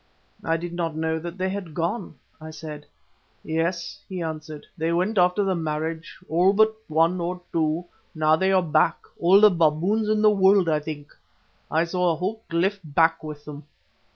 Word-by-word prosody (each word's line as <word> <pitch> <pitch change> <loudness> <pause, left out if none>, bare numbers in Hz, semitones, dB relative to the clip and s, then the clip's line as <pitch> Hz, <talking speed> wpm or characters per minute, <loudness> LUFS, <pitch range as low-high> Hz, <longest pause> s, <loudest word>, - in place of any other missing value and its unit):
"I 165 0 +1
did 170 +1 -6
not 165 -2 -2
know 160 0 -1
that 170 +2 -7
they 185 0 -1
had 185 -5 -6
gone," 175 +1 -3 0.3
I 155 - -8
said. 155 -2 -9 0.6
"Yes," 165 +2 -2
he 185 -2 -5
answered, 155 -1 -6
"they 165 -1 -1
went 185 +5 +1
after 180 +3 +3
the 195 -1 +1
marriage, 160 0 -4
all 180 +4 +3
but 220 +1 +3
one 165 +3 +2
or 180 +1 -3
two; 160 +1 0 0.3
now 155 0 +3
they 190 +4 +1
are 190 -1 +3
back, 160 0 +2 0.2
all 180 +3 +6
the 210 0 +7
baboons 175 +6 +1
in 215 0 +2
the 215 - +6
world, 195 -2 +4
I 155 -2 +2
think. 150 -1 -8 0.5
I 160 +1 +2
saw 180 +1 0
a - - -1
whole 195 +7 -3
cliff 185 +4 0
black 160 +2 +2
with 150 -1 -8
them." 150 0 -9
170 Hz, 180 wpm, -24 LUFS, 160-185 Hz, 0.6 s, the